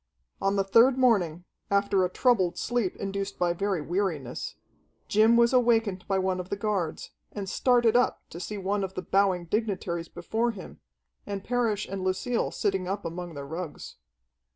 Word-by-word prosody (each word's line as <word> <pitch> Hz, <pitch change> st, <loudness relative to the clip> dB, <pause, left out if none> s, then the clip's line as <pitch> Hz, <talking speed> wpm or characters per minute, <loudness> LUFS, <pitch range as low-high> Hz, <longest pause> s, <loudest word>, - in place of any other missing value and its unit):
On 195 Hz, 0 st, +1 dB
the 195 Hz, -, +2 dB
third 230 Hz, +7 st, +5 dB
morning, 185 Hz, -10 st, +2 dB, 0.3 s
after 200 Hz, -1 st, +2 dB
a 180 Hz, -, +1 dB
troubled 185 Hz, -5 st, +2 dB
sleep 240 Hz, -6 st, -1 dB
induced 195 Hz, 0 st, -4 dB
by 175 Hz, -1 st, +1 dB
very 195 Hz, -1 st, -1 dB
weariness, 165 Hz, -7 st, -2 dB, 0.5 s
Jim 220 Hz, +3 st, +5 dB
was 235 Hz, +1 st, +4 dB
awakened 225 Hz, -6 st, +2 dB
by 195 Hz, -, +1 dB
one 185 Hz, -1 st, 0 dB
of 180 Hz, 0 st, -6 dB
the -, -, -1 dB
guards, 200 Hz, -6 st, -2 dB, 0.2 s
and 200 Hz, -2 st, -5 dB
started 240 Hz, +1 st, +3 dB
up 245 Hz, -, +2 dB
to 170 Hz, -, -7 dB
see 210 Hz, +3 st, -5 dB
one 200 Hz, +1 st, -1 dB
of 190 Hz, 0 st, -5 dB
the 185 Hz, -, -4 dB
bowing 190 Hz, -3 st, +2 dB
dignitaries 185 Hz, -4 st, -2 dB
before 220 Hz, +7 st, -1 dB
him, 210 Hz, -5 st, -8 dB, 0.5 s
and 200 Hz, -1 st, -4 dB
Parrish 230 Hz, -4 st, 0 dB
and 195 Hz, -1 st, -4 dB
Lucille 190 Hz, +6 st, 0 dB
sitting 195 Hz, -3 st, -1 dB
up 195 Hz, 0 st, -3 dB
among 170 Hz, 0 st, -5 dB
their 140 Hz, 0 st, -6 dB
rugs. 165 Hz, +2 st, -7 dB
195 Hz, 170 wpm, -27 LUFS, 180-220 Hz, 0.5 s, third